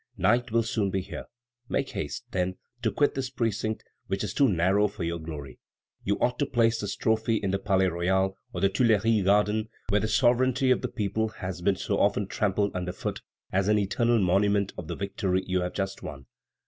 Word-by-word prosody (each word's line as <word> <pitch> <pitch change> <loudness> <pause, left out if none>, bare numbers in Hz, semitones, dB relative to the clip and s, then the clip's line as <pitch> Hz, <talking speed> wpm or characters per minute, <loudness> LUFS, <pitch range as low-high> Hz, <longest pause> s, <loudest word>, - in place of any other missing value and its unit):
Night 120 +1 +2
will 115 +1 +3
soon 110 -3 0
be 95 0 -1
here. 90 - -7 0.4
Make - - 0
haste, - - -4
then, 95 0 -1 0.3
to 115 - +2
quit 145 - +2
this 135 -1 -3
precinct, 110 -3 -2 0.2
which 95 +2 -2
is 105 -2 -3
too 140 0 +4
narrow 95 +3 +3
for 105 -2 -6
your 85 0 -2
glory. 75 -5 -8 0.4
You 100 +1 0
ought 125 0 +1
to 145 - +1
place 115 -3 +2
this 100 -1 -3
trophy 110 0 +1
in 100 -3 -1
the 100 - 0
Palais 95 -2 +2
Royal 95 +2 +1 0.2
or 90 - -4
the 100 - +4
Tuileries 110 -1 +3
garden, 105 +3 +2 0.2
where 105 +1 +3
the 110 - 0
sovereignty 130 +2 +3
of 125 - +3
the - - -1
people 110 0 -1
has 95 -4 -6
been 95 +2 +2
so 100 +1 -1
often 100 0 +2
trampled 100 0 0
under 90 0 -2
foot, 90 - -4 0.3
as 95 +1 +1
an 105 0 +4
eternal 115 +4 +2
monument 100 +1 +2
of 85 - -7
the - - -4
victory 100 -2 -1
you 90 -1 0
have 90 0 -3
just 95 -1 -3
won." 70 -2 -8
100 Hz, 205 wpm, -27 LUFS, 95-110 Hz, 0.4 s, too